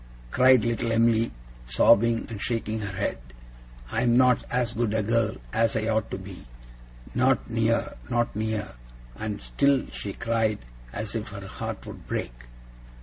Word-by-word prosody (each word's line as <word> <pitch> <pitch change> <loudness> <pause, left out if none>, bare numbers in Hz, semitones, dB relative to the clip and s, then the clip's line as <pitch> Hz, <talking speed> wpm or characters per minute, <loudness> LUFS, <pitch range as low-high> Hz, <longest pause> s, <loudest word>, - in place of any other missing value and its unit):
cried 130 -3 +5
little 115 0 0
Em'ly, 115 0 +3 0.3
sobbing, 115 - +4
and 105 -3 -7
shaking 110 -2 -2
her 100 -3 -5
head. 100 -10 -1 0.7
'I - - 0
am 120 0 +4
not 125 -1 +5
as 120 -2 0
good 115 -2 0
a 110 - +1
girl 115 +1 +1 0.2
as 115 0 +2
I 110 0 -1
ought 110 -1 +1
to - - -4
be. 95 -6 -10 0.7
Not 130 +1 +2
near! 115 0 +1 0.2
not 120 -2 0
near!' 110 - -2 0.4
And 105 +3 -4
still 140 -2 +2
she 100 - -5
cried, 115 -1 0 0.3
as 105 - -4
if 115 -2 -3
her 100 -2 -8
heart - - -5
would - - -10
break. - - -3
115 Hz, 155 wpm, -26 LUFS, 105-115 Hz, 0.7 s, cried